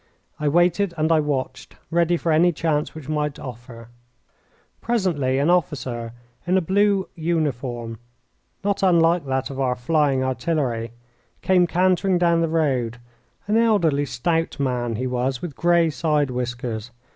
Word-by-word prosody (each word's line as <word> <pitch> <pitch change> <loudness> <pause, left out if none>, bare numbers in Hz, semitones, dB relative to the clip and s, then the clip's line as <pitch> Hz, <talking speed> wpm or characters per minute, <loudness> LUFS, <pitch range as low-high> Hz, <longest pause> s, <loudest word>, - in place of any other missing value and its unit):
I 150 - -1
waited 175 +4 +2
and 155 +1 +1
I 160 - +5
watched, 145 -3 -3 0.2
ready 170 +1 +2
for 165 - -1
any 170 +3 +4
chance 155 -2 -1
which 155 -4 -9
might 150 -1 -2
offer. 120 -2 -10 0.9
Presently 175 - 0
an 145 +5 +2
officer, 130 -9 -1 0.3
in 185 +2 +3
a - - +5
blue 195 +2 +2
uniform 130 -9 -2 0.6
not 200 0 0
unlike 170 -4 +3
that 130 0 -1
of 135 - -7
our 130 -2 +1
flying 135 0 +1
artillery, 130 -3 -1 0.5
came 180 -2 +4
cantering 185 +2 +2
down 170 -1 +3
the 165 - 0
road 130 -8 0 0.5
an 210 +2 +1
elderly, 170 -11 +2
stout 165 +8 -1
man 125 -4 -1
he 125 +4 -3
was, 125 +1 -1
with 155 -2 -6
grey 170 -2 +3
side 150 -3 0
whiskers. 125 -2 -4
150 Hz, 145 wpm, -22 LUFS, 130-170 Hz, 0.9 s, I